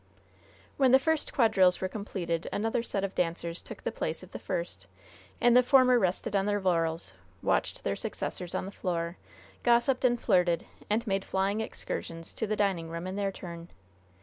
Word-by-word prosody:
When 265 -2 +4
the - - +10
first 320 +3 0
quadrilles 190 -8 +4
were 190 - -1
completed, 185 -5 -3
another 225 +3 0
set 200 -4 -2
of 195 -1 -2
dancers 170 0 -1
took - - -10
the - - -1
place - - -3
of - - -13
the - - -6
first, - - -4 0.5
and 240 0 +5
the 250 - +9
former 255 -1 +5
rested 190 +2 0
on 195 0 +2
their 205 0 +1
laurels, 165 - 0 0.3
watched - - 0
their - - 0
successors 180 -1 -4
on - - -1
the 195 - -6
floor, 170 -3 -3 0.4
gossiped 240 +2 +3
and 240 -1 +3
flirted, 180 -6 +2 0.2
and 220 +3 +1
made 195 -2 0
flying 195 +3 0
excursions 165 -6 -5
to 220 - -2
the 215 - 0
dining 190 -6 0
room 170 +1 -5
in 185 +1 -4
their 200 -1 0
turn. 170 -2 -9
195 Hz, 180 wpm, -29 LUFS, 175-235 Hz, 0.5 s, the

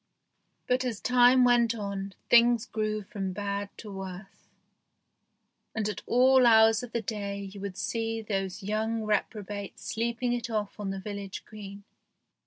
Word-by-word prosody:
But 250 +1 +1
as 235 -5 -3
time 250 0 +5
went 240 -1 +4
on, 200 -2 -5
things 235 -1 +5
grew 215 -2 -2
from 195 -1 -4
bad 200 +1 -3
to 210 - -9
worse, 195 0 -9 1.3
and 220 -2 0
at 210 - -4
all 255 +1 +5
hours 220 -1 +6
of 245 -2 -8
the 230 -1 -2
day 200 -1 -4
you 200 - -9
would 195 -2 -5
see 225 +2 -2
those 195 -1 -3
young 220 +2 -1
reprobates 205 -1 -3
sleeping 235 +2 -1
it 240 0 -3
off 210 -2 -3
on 205 -2 -3
the 195 0 -3
village 200 0 -6
green. 200 -1 -10
215 Hz, 150 wpm, -28 LUFS, 200-235 Hz, 1.3 s, hours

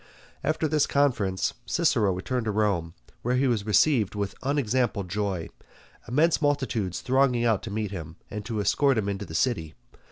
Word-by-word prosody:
After 155 +2 0
this 150 -1 +2
conference 115 -10 +1
Cicero 105 -4 +2
returned 115 +7 -2
to 110 - 0
Rome, 100 -6 0 0.3
where 125 +2 0
he 130 +2 +2
was 110 -4 0
received 110 -2 +3
with 100 -1 -2
unexampled 125 -8 0
joy, 100 -3 -2 0.6
immense 155 +7 +2
multitudes 130 - 0
thronging 130 -2 +2
out 110 -4 +2
to - - -6
meet 105 -1 -2
him, 80 -5 -7 0.2
and 105 0 -5
to 115 -3 -3
escort 135 +6 +2
him 105 -2 0
into 100 0 -3
the 80 - -8
city. 80 -9 0
110 Hz, 165 wpm, -26 LUFS, 100-130 Hz, 0.6 s, received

